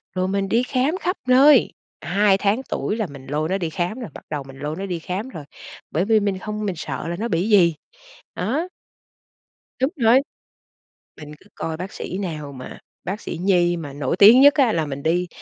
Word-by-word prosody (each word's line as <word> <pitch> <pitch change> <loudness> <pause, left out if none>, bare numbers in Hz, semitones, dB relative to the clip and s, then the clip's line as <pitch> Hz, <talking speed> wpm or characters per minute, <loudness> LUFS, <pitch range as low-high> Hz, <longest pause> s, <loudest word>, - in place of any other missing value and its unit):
Rồi 185 0 0
mình 195 0 -1
đi 235 +4 +2
khám 265 +6 0
khắp 365 0 -2
nơi, 265 +1 +6 0.3
2 200 +1 +2
tháng 205 +5 +1
tuổi 210 - -2
là 220 -4 -1
mình 140 -3 -12
lôi 150 +3 -2
nó 190 - 0
đi 170 -4 -3
khám 175 +8 -3
rồi, 235 - -6
bắt - - -12
đầu 150 -2 -4
mình 135 0 -13
lôi 150 +2 -4
nó 195 - -4
đi 180 -3 -4
khám 190 +9 -5
rồi, 155 - -9 0.5
bởi 170 +5 0
vì 220 +1 +4
mình 200 -2 -1
hông 210 0 -4
mình 195 -3 -2
sợ 160 - -5
là 170 - -3
nó 220 +6 -3
bị 190 0 -1
gì, 175 -6 +5 0.6
đó. 265 - -1 1.1
Đúng 265 - +2
rồi, 240 -2 +5 1.0
mình 150 -1 -10
cứ 205 - -22
coi 160 -1 -4
bác 185 +3 -6
sĩ 185 - -6
nào 155 -7 -5
mà 130 -2 -10 0.2
bác 195 +5 -4
sĩ - - -6
nhi 175 -2 +2
mà 145 -4 -7
nổi 140 0 -2
tiếng 225 +6 +9
nhất 285 +1 +8
á 265 -5 +3
là 160 -2 0
mình 140 -1 -6
đi, 175 +3 +1
190 Hz, 215 wpm, -22 LUFS, 160-220 Hz, 1.1 s, tiếng